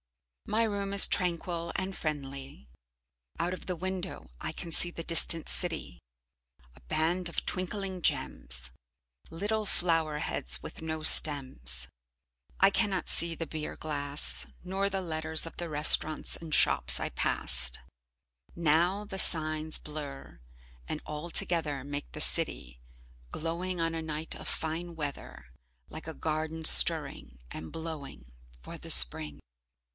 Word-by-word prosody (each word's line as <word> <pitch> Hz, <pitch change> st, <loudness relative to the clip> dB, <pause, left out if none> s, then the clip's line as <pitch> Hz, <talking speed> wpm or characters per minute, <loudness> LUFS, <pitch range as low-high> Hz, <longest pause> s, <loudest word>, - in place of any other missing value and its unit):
My 220 Hz, +2 st, 0 dB
room 200 Hz, -3 st, -4 dB
is 200 Hz, -, +7 dB
tranquil 170 Hz, -2 st, -2 dB
and 190 Hz, 0 st, -5 dB
friendly. 135 Hz, -, -7 dB, 0.7 s
Out 175 Hz, +2 st, -2 dB
of 185 Hz, -, -10 dB
the 180 Hz, -, -3 dB
window 185 Hz, -, -7 dB
I -, -, -5 dB
can 170 Hz, -, -8 dB
see 175 Hz, -, +3 dB
the 165 Hz, -, -7 dB
distant 165 Hz, 0 st, +9 dB
city, 160 Hz, -, -3 dB, 0.8 s
a -, -, -18 dB
band 170 Hz, -, -1 dB
of -, -, -6 dB
twinkling 185 Hz, 0 st, -5 dB
gems, 60 Hz, -, -3 dB, 0.6 s
little 210 Hz, +6 st, -4 dB
flower 165 Hz, -5 st, -1 dB
heads 65 Hz, -, 0 dB
with -, -, -11 dB
no 160 Hz, -1 st, -6 dB
stems. 130 Hz, -, +3 dB, 0.7 s
I 195 Hz, -, +5 dB
cannot 200 Hz, -2 st, -2 dB
see 170 Hz, 0 st, +2 dB
the 165 Hz, -, -6 dB
beer 155 Hz, 0 st, -7 dB
glass, 145 Hz, -1 st, -3 dB, 0.2 s
nor 195 Hz, +2 st, -3 dB
the 195 Hz, -1 st, -4 dB
letters 160 Hz, -2 st, -3 dB
of 165 Hz, -, -10 dB
the 175 Hz, -1 st, -7 dB
restaurants 155 Hz, +1 st, +3 dB
and 165 Hz, -2 st, -7 dB
shops -, -, +5 dB
I -, -, -4 dB
passed, 65 Hz, -1 st, -1 dB, 0.8 s
now 170 Hz, +5 st, 0 dB
the 190 Hz, -1 st, -7 dB
signs 155 Hz, -2 st, +3 dB
blur 145 Hz, -, -10 dB, 0.5 s
and -, -, -5 dB
all 150 Hz, +3 st, -7 dB
together 155 Hz, -6 st, 0 dB
make 145 Hz, 0 st, -7 dB
the 155 Hz, -, -6 dB
city, 65 Hz, -, +2 dB, 0.5 s
glowing 175 Hz, +3 st, -5 dB
on 165 Hz, 0 st, -2 dB
a 165 Hz, -, -5 dB
night 160 Hz, 0 st, -3 dB
of -, -, -10 dB
fine 165 Hz, +2 st, -5 dB
weather, 145 Hz, -, -7 dB, 0.4 s
like -, -, -11 dB
a -, -, -7 dB
garden 155 Hz, -, -4 dB
stirring 145 Hz, -, +5 dB
and 80 Hz, -, -9 dB
blowing 150 Hz, -, -9 dB, 0.3 s
for -, -, -10 dB
the -, -, -7 dB
Spring. 70 Hz, +5 st, +6 dB
160 Hz, 140 wpm, -28 LUFS, 145-175 Hz, 0.8 s, distant